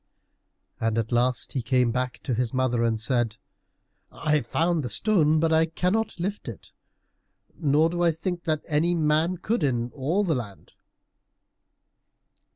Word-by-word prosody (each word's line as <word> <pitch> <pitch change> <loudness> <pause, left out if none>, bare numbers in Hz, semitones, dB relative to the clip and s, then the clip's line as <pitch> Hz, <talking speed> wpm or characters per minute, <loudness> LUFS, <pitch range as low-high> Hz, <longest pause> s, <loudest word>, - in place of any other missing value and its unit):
And 115 0 0
at 115 0 -1
last 120 0 0
he 130 - -1
came 125 0 +2
back 125 0 -2
to 125 - -2
his 120 +1 -1
mother 130 -2 +1
and 115 -1 +1
said, 115 -1 0 0.7
"I 150 0 +1
have 125 -5 -4
found 165 +4 +1
the 125 - -4
stone, 155 - +2
but 160 0 +2
I 160 0 +4
cannot 185 +5 -1
lift 200 +4 -4
it, - - -9 0.8
nor 155 +1 +3
do 175 +1 -3
I 175 - +4
think 170 +2 -4
that 155 -2 -1
any 165 +3 +1
man 160 +3 +1
could, 215 +5 -1
in 120 -3 0
all 155 +9 0
the 175 -5 +1
land." 115 -7 -6
150 Hz, 160 wpm, -25 LUFS, 120-170 Hz, 0.8 s, I